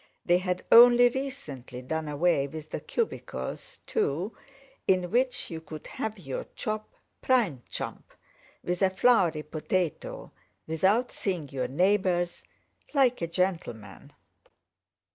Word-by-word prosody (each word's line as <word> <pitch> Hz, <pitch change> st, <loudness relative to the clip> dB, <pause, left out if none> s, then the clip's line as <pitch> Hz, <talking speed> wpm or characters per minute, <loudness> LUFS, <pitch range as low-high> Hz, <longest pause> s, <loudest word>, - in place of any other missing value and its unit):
They 175 Hz, 0 st, +4 dB
had 180 Hz, 0 st, -2 dB
only 245 Hz, +1 st, +9 dB
recently 240 Hz, -, -6 dB
done 160 Hz, +4 st, -3 dB
away 150 Hz, -1 st, +2 dB
with 155 Hz, +1 st, -9 dB
the -, -, -3 dB
cubicles, 65 Hz, 0 st, -4 dB
too, 170 Hz, +10 st, -1 dB, 0.5 s
in 185 Hz, -2 st, +2 dB
which 250 Hz, -1 st, 0 dB
you 160 Hz, -1 st, -5 dB
could 155 Hz, -1 st, -9 dB
have 220 Hz, 0 st, -4 dB
your 135 Hz, -8 st, -5 dB
chop, 215 Hz, 0 st, -4 dB, 0.3 s
prime 215 Hz, -, +2 dB
chump, -, -, -6 dB, 0.5 s
with 180 Hz, 0 st, -2 dB
a 190 Hz, -, +5 dB
floury 185 Hz, -7 st, +3 dB
potato, 160 Hz, +2 st, -3 dB, 0.3 s
without 190 Hz, +10 st, +2 dB
seeing 175 Hz, -8 st, -3 dB
your 130 Hz, -1 st, -2 dB
neighbours, 180 Hz, +2 st, +1 dB, 0.5 s
like 255 Hz, -5 st, +3 dB
a 170 Hz, -, 0 dB
gentleman. 165 Hz, -, -3 dB
180 Hz, 120 wpm, -28 LUFS, 155-215 Hz, 0.5 s, only